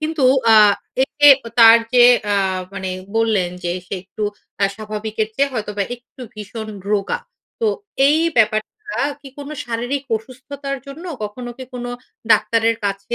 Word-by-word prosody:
কিন্তু 310 -3 -1 0.3
আ - - +7 0.5
এতে 290 +2 +2 0.2
অ - - -4
তার 230 0 +9 0.2
যে 245 -1 +7 0.3
আ - - +3 0.4
মানে 190 -1 -4 0.3
বললেন 215 -6 +1
যে 175 - 0 0.2
সে - - -4
একটু 205 +2 -8 0.4
আ - - +6
স্বাভাবিকের 215 0 -4
চেয়ে 280 +2 +1
হয়তোবা 210 -3 -3
একটু 245 +2 -21
ভীষণ 215 +1 -7 0.2
রোগা। 200 -2 0 0.4
তো 450 - +2 0.4
এই 300 - +4 0.2
ব্যাপারটা 215 -1 +2 0.5
কি 275 - -11
কোনো 285 +1 -7
শারীরিক 245 +4 -3
অসুস্থতার 275 +4 -7
জন্য? 295 +6 -10 0.2
কখনো 240 +4 -7
কি 260 - -6
কোনো 245 0 -5 0.4
ডাক্তারের 230 0 +2
কাছে 200 +3 -3
230 Hz, 145 wpm, -19 LUFS, 215-270 Hz, 0.5 s, তার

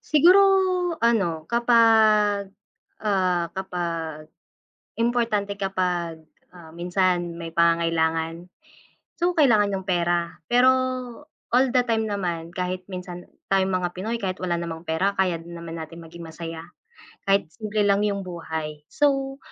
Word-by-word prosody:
Siguro 345 +6 +5 0.6
ano, 195 -9 +1
kapag, 220 -3 +4 0.5
ah 185 -5 +1
kapag 165 -5 -4 0.7
importante 230 -4 0
kapag, 180 -4 -2 0.3
ah, 170 -2 -14
minsan 175 -1 0
may 165 -1 -7
pangangailangan. 165 0 +1 0.7
So, 350 +1 +2
kailangan 215 -10 +4
yung 190 0 -5
pera. 175 -1 0
Pero 245 +2 +5 0.8
all 255 +1 +3
the 250 - +4
time 225 -1 +1
naman, 175 -5 -3
kahit 180 -1 -3
minsan 180 -2 -7 0.2
tayong 190 -1 +2
mga 180 -1 0
Pinoy 225 +5 -3
kahit 185 -2 -2
wala 170 -1 -1
namang 165 0 -6
pera 185 +5 0
kaya 180 -3 +1
din 170 +1 -10
naman 165 -1 -7
natin 165 +1 -9
maging 170 +1 -12
masaya. 165 0 -8 0.6
Kahit 195 -5 +2
simple 215 0 -2
lang 200 0 +3
yung 200 -1 -2
buhay. 160 -3 -6
So, 275 - 0
180 Hz, 125 wpm, -24 LUFS, 170-210 Hz, 0.8 s, Siguro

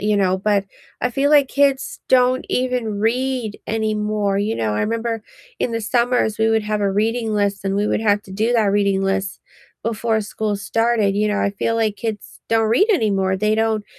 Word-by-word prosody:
you 210 0 +1
know, 190 -2 +2
but 200 0 +1 0.4
I 250 - +1
feel 275 +4 +1
like 285 -3 +5
kids 280 -1 +1
don't 255 0 +3
even 250 -5 -1
read 245 0 -1
anymore, 210 -2 -1
you 210 +2 -1
know, 110 -2 -1
I 105 - -1
remember 230 0 -2 0.4
in 240 - -1
the 230 - -1
summers 240 -1 +1
we 220 0 +3
would 225 -1 +2
have 210 0 -2
a 200 - +1
reading 220 +2 0
list, 200 -1 -1
and 195 - 0
we 205 +1 +1
would - - 0
have 210 -2 +2
to 190 - -12
do 220 +5 0
that 225 -2 +3
reading 200 -1 +1
list 195 0 -2 0.4
before 225 0 0
school 210 0 -3
started, 220 0 +1
you 210 +1 +1
know, 210 - 0
I 200 - +1
feel 205 +3 -2
like 220 -2 0
kids 220 0 -6
don't 225 -1 +2
read 255 - +4
anymore, 195 - +1
they 210 +2 +1
don't 220 -1 0
215 Hz, 200 wpm, -20 LUFS, 205-230 Hz, 0.4 s, like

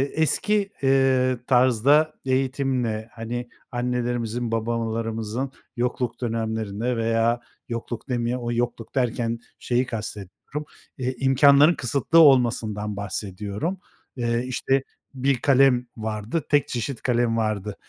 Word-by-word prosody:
eski, 200 +6 +2
eee, 135 -1 +3
tarzda 130 +4 +4
eğitimle, 130 -4 0
hani, 120 +2 -5 0.2
annelerimizin, 120 -1 -2
babalarımızın 115 +2 -2 0.2
yokluk 120 0 -2
dönemlerinde 110 0 -2
veya 115 +1 +1 0.3
yokluk 115 +1 -5
demeye 120 0 0
o 120 -1 -3
yokluk 120 0 -3
derken 120 -2 0 0.2
şeyi 125 +1 +1
kastediyorum, 110 +5 -6 0.3
eee, 130 -1 -2
imkânların 140 +4 +6
kısıtlı 140 +5 +2
olmasından 115 -8 +3
bahsediyorum. 100 - -4 0.4
Eee, 120 -1 0
işte, 135 +1 0 0.3
1 135 +1 +2
kalem 135 -2 +4
vardı, 110 +7 -3
tek 145 -1 +3
çeşit 120 +1 -3
kalem 120 -2 +1
vardı. 105 -2 -1
120 Hz, 105 wpm, -24 LUFS, 115-130 Hz, 0.4 s, imkânların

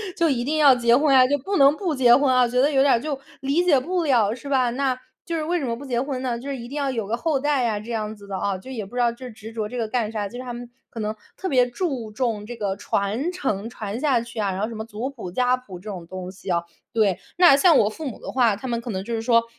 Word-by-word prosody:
就 335 -2 +2
一 240 -3 0
定 305 +4 -1
要 280 -4 +7
结 235 -1 +4
婚 285 +1 +3
啊， 255 -1 +7
就 285 +3 +2
不 390 +9 -2
能 280 +1 +6
不 345 -7 -1
结 245 -2 +6
婚 280 -2 +3
啊， 250 -1 +4
觉 250 +1 +1
得 290 +2 +3
有 270 -1 +4
点 280 - +5
儿 230 - +3
就 290 -2 -3 0.2
理 280 +6 +1
解 300 -7 +4
不 350 +5 -1
了 235 -7 +3
是 270 +3 -11
吧？ 260 -3 +2
那 260 +1 0 0.3
就 335 - -3
是 315 - -1
为 350 +3 0
什 285 - -2
么 230 -1 -1
不 275 - -10
结 245 -3 -1
婚 265 -1 -3
呢？ 245 -2 -1
就 260 +4 -9
是 275 - -2
一 235 0 -8
定 285 +3 -6
要 275 -2 0
有 225 -5 -3
个 230 +2 -1
后 300 -1 0
代 280 -4 +1
啊， 210 -2 -1
这 230 +3 -8
样 215 -1 -3
子 200 -1 -14
的 195 -1 -4
哦， 200 0 -1
就 260 - -11
也 225 -6 -4
不 240 - -13
知 - - -1
道 235 -1 +3
这 250 +1 -9
执 220 0 -10
着 220 -2 -3
这 250 - -7
个 225 - -1
干 220 -1 -1
啥？ 210 -2 -2
就 245 - -9
是 - - -5
他 245 - -6
们 240 0 -7 0.2
可 230 - -8
能 215 +1 -2 0.2
特 380 - -4
别 250 -5 +3
注 255 - -3
重 220 -3 -2
这 240 - -6
个 200 -3 -2
传 220 - -1
承， 230 - -2
传 215 -1 -5
下 270 -5 +2
去 235 -1 -8
啊， 200 -2 0
然 185 - -4
后 215 - 0
什 230 - -7
么 220 0 -5
族 230 +3 -5
谱、 225 -9 -8
家 250 +4 +2
谱 205 -8 -10
这 210 - -14
种 175 -4 -7
东 185 0 -6
西 190 0 -10
啊， 170 -1 +1 0.3
对。 210 -5 +2 0.2
那 345 -6 +8
像 325 +1 +5
我 210 - +4
父 305 +6 -6
母 - - -10
的 - - -7
话， 235 -5 +3
他 260 +5 -7
们 235 -1 -2
可 235 - -7
能 190 -2 -3
就 235 - -5
是 225 - -1
说， 230 0 +4
245 Hz, 335 characters per minute, -23 LUFS, 220-275 Hz, 0.3 s, 那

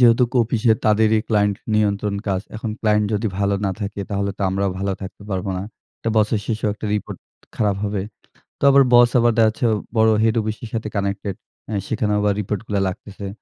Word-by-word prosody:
যেহেতু 120 0 +6
অফিসে 115 -1 +3
তাদেরই 110 0 +4
ক্লায়েন্ট 105 -2 +2 0.2
নিয়ন্ত্রণ 105 -1 +1
কাজ। 95 -1 0 0.2
এখন 110 0 -4
ক্লায়েন্ট 105 -1 +2
যদি 105 +2 0
ভালো 100 0 +1
না - - 0
থাকে, 100 0 -4
তাহলে 100 0 -1
তো - - -2
আমরাও 95 +1 0
ভালো 100 0 -1
থাকতে 95 +2 -8
পারব 95 +1 -2
না। - - -4 0.4
তো 115 - -1
বছর 110 0 +3
শেষেও 110 -2 -1
একটা 105 - -6
রিপোর্ট 105 - -4 0.4
খারাপ 105 -3 +1
হবে। 100 -2 -1 0.6
তো - - -23
আবার 140 0 +7
বস 120 0 +7
আবার 120 0 +4
দেখা 115 -1 +5
যাচ্ছে 110 +4 -3 0.3
বড় 110 0 +5
হেড 110 0 +3
অফিস 110 0 -3
এর 115 - -6
সাথে 110 -1 -2
কানেক্টেড। 100 -1 -2 0.3
এ্যাঁ 105 -3 -1
সেখানেও 105 -2 0
আবার 105 0 +2
রিপোর্টগুলা 105 0 -2
লাগতেছে। 100 +2 -7
105 Hz, 190 wpm, -21 LUFS, 100-110 Hz, 0.6 s, আবার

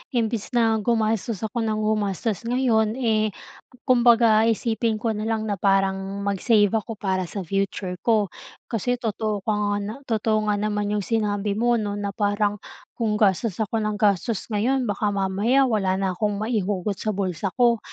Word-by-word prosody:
imbis 230 +1 -1
na 225 -2 +3
gumastos 220 -1 0
ako 220 +2 -2
nang 215 -1 -1
gumastos 215 +1 -1
ngayon, 235 -3 +2
eh, 215 -5 0 0.5
kumbaga 235 -3 +5
isipin 225 0 0
ko 225 +1 -1
na 215 +1 -3
lang 225 -1 -1
na 205 -4 -3
parang 195 0 +1
mag-save 205 +1 +2
ako 225 0 -2
para 190 -3 -2
sa 195 +2 -5
future 190 0 -2
ko. 215 -4 +1 0.4
Kasi 245 +3 0
totoo 215 -3 -2
ka 220 - 0
nga 205 -1 0
na 210 +2 -4
totoo 215 -1 0
nga 210 - +2
naman 210 -1 -1
'yong 205 -2 -1
sinabi 210 -2 -1
mo, 240 +1 +3
'no, 205 -2 -2
na 200 -1 -4
parang 205 0 0 0.4
kung 215 -3 -1
gastos 205 0 +1
ako 220 +1 -1
ng 210 -1 -1
gastos 205 0 +1
ngayon 245 +4 +1
baka 205 0 0
mamaya 205 +8 +2
wala 195 -5 +1
na 190 -2 -1
kong 205 +1 -1
maihugot 205 -3 -1
sa 215 - -1
bulsa 190 -1 -2
ko. 235 -2 +4
215 Hz, 165 wpm, -24 LUFS, 200-225 Hz, 0.5 s, kumbaga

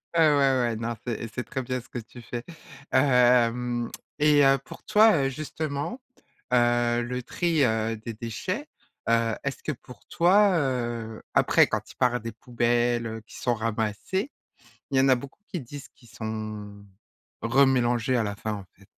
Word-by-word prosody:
Heu, - - +3
ouais - - +6
ouais, 135 -6 +3
non 115 +1 -3
c'est 115 -1 -3
c'est 125 - -3
très 135 - -4
bien 125 0 -3
ce 125 - -21
que 120 - -5
tu 120 +2 -12
fais. 120 0 -6 0.5
Hem, 125 -2 +3 0.3
et 150 -1 +5
heu, 135 0 +5
pour 135 - -13
toi, 210 -9 +5
heu, - - +1
justement, 155 - -4 0.5
heu, 120 0 +3
le 125 +1 -3
tri, 165 +3 0
heu, 110 -1 0
des 115 +2 -7
déchets, 150 - -4 0.4
heu, 115 -1 +2
est-ce 140 -1 -3
que 155 - -1
pour 125 -1 -15
toi 190 +2 +4
heu 120 -6 -2
après - - +5
quand - - -3
ils - - -17
parlent 125 -2 +2
des 115 +1 -5
poubelles, 120 0 0
heu, 110 0 -6
qui - - -13
sont 120 - 0
ramassées, 115 - -2 0.6
il 135 - +1
y - - +6
en 135 - +4
a 130 - +6
beaucoup 135 +7 -9
qui 180 -5 -4
disent 135 +2 -9
qu'ils 120 -3 -20
sont 110 -2 -6 0.6
remélangés 125 -1 +3
à 115 - +1
la 100 -1 -3
fin, 110 +1 -4
en 100 -2 -7
fait. 100 - -21
120 Hz, 175 wpm, -26 LUFS, 115-140 Hz, 0.6 s, ouais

